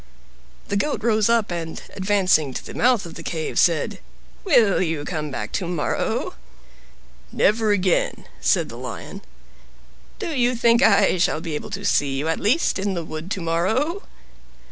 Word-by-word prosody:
The 200 - -1
Goat 250 0 -1
rose 220 -2 +2
up, 230 -5 +2
and, 165 -2 -4
advancing 185 -8 +2
to - - -5
the - - -8
mouth 245 -4 +2
of 170 - -9
the - - -9
cave, 160 -1 -3
said, 170 -3 +2 0.4
"Will 240 - +4
you 160 -4 -2
come 155 -3 -3
back 110 -6 -5
tomorrow?" 175 -5 -2 1.0
"Never 215 +1 +2
again," 185 -3 +1
said - - +1
the - - -9
Lion. - - -7 1.0
"Do 350 -8 -4
you 250 -1 +2
think 235 0 +4
I 200 -3 +4
shall 155 - +2
be 165 -1 -5
able 150 - -5
to 200 0 -5
see 140 -7 +1
you, 145 +3 -2
at 165 - 0
least, 235 +2 +1
in 195 0 -1
the 170 -2 -4
wood 155 +3 -7
to 195 -2 -3
morrow?" 220 - 0
190 Hz, 165 wpm, -22 LUFS, 165-225 Hz, 1.0 s, Will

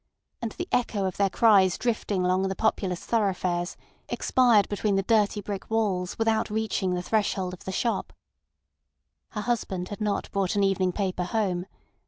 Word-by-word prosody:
And 230 -2 -3
the 350 - -5
echo 215 -5 +1
of 185 - -3
their 200 -1 +3
cries 195 -5 +4
drifting 210 -5 -1
along 185 +1 +2
the 190 - -3
populous 190 -4 -1
thoroughfares, 185 -5 0 0.3
expired 235 -6 +3
between 205 0 0
the 195 - +1
dirty 210 -1 +2
brick 200 -1 -6
walls 200 -5 0
without 225 0 +1
reaching 210 -4 -1
the 180 - -3
threshold 195 -3 0
of 180 - -11
the 190 - -3
shop. 230 +5 -1 1.2
Her 210 - -3
husband 200 -6 -2
had 205 +1 -7
not 210 -1 -1
brought 195 -1 0
an 200 - +2
evening 190 -1 +2
paper 185 -2 -2
home. 185 -3 -1
200 Hz, 165 wpm, -26 LUFS, 185-220 Hz, 1.2 s, cries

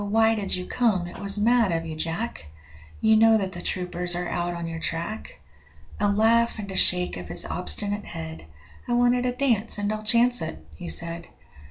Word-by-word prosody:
why 220 +2 +3
did 205 -3 0
you 180 0 -4
come? 215 -8 +1
it 175 - -9
was 200 0 -2
mad 230 -1 +3
of 165 0 -1
you, 160 -1 -6
Jack; 165 - -4 0.5
You 220 0 +5
know 225 0 +6
that 190 -3 -2
the 175 - -7
troopers 180 -1 -2
are 175 0 -3
out 175 0 -2
on 170 0 -5
your 165 0 -5
track.' 190 - -4 0.6
A 205 - +2
laugh 230 +3 +3
and 200 -2 -6
a - - -6
shake 180 - +4
of 90 -1 -8
his 85 +1 0
obstinate 205 +3 -1
head 80 0 -7 0.4
'I 240 - -1
wanted 245 +1 +2
a - - +1
dance, 245 -5 0
and 205 +1 -1
I'll 215 - -4
chance 235 +3 +3
it,' 160 - -4 0.2
he 85 - -7
said. 170 - -1
200 Hz, 200 wpm, -25 LUFS, 170-225 Hz, 0.6 s, know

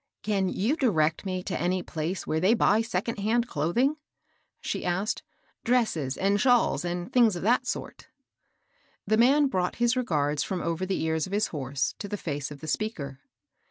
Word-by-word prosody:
" - - -60
Can 195 -3 +1
you 225 +12 0
direct 170 - +1
me 185 -1 -2
to - - -3
any 180 +1 0
place 165 +3 -4
where 160 - 0
they 190 +7 +4
buy 220 -1 +3
second 225 0 -2
hand 230 +4 +1
clothing? 240 - +1 0.3
" - - -44
she - - -3
asked; 185 +4 -1 0.2
" - - -40
dresses 195 - +1
and 200 +2 +2
shawls, 245 - +3
and 175 0 -4
things 235 -6 +5
of 175 - -5
that 235 +5 +2
sort." - - -5 1.0
The 215 +2 +2
man 275 +6 +5
brought 185 -9 -1
his 240 +1 +2
regards 150 - 0
from 185 +3 -2
over 170 +2 -2
the 190 - -1
ears 160 0 0
of 190 - -8
his 210 +1 +1
horse 140 -2 -2
to 205 - -5
the 205 - -4
face 145 -6 -4
of 145 -1 -10
the 155 - -7
speaker. 150 -8 -3
185 Hz, 195 wpm, -27 LUFS, 160-230 Hz, 1.0 s, things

